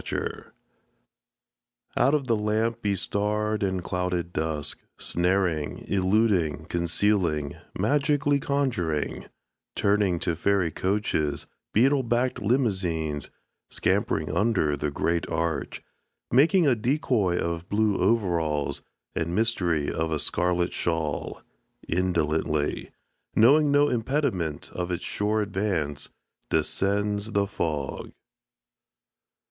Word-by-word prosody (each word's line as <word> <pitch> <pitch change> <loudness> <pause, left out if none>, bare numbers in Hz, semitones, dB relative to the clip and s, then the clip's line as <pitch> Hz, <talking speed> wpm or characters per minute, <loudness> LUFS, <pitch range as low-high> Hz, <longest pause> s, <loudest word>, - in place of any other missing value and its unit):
THE - - -3 0.2
FOG - - -13 1.5
Out 135 +5 +4
of 140 -3 -1
the 115 -3 +2
lamp 110 +2 0
bestarred 105 +1 0
and 95 -2 -1
clouded 90 -1 -2
dusk 75 -2 -2 0.2
Snaring, 90 -4 0
illuding, 95 - +1
concealing, 85 -3 +1 0.2
Magically 145 +5 +2
conjuring 125 - -1 0.5
Turning 100 -3 +2
to 85 - 0
fairy 95 0 +1
coaches 95 -5 -1 0.3
Beetle 135 +5 +4
backed 120 +1 0
limousines 95 - 0 0.4
Scampering - - 0
under 100 -9 +2
the 75 +1 -2
great 85 +4 -1
Arch 85 0 -2 0.5
Making 165 - +5
a 135 - +5
decoy 115 - +1
of 85 +1 -3
blue 105 -1 +1
overalls 85 -10 +1 0.3
And 85 +2 -2
mystery 90 -9 +1
of 80 0 -1
a 80 - +1
scarlet 90 +3 +1
shawl 80 -4 -2 0.4
Indolently 80 -4 0 0.5
Knowing 145 +6 +5
no 145 0 +5
impediment 115 - -1
of 90 0 -3
its 90 -1 -3
sure 105 +1 0
advance 95 -8 -2 0.4
Descends 100 +6 0
the 100 0 +2
fog. 75 -8 -3
95 Hz, 100 wpm, -26 LUFS, 80-110 Hz, 1.5 s, Making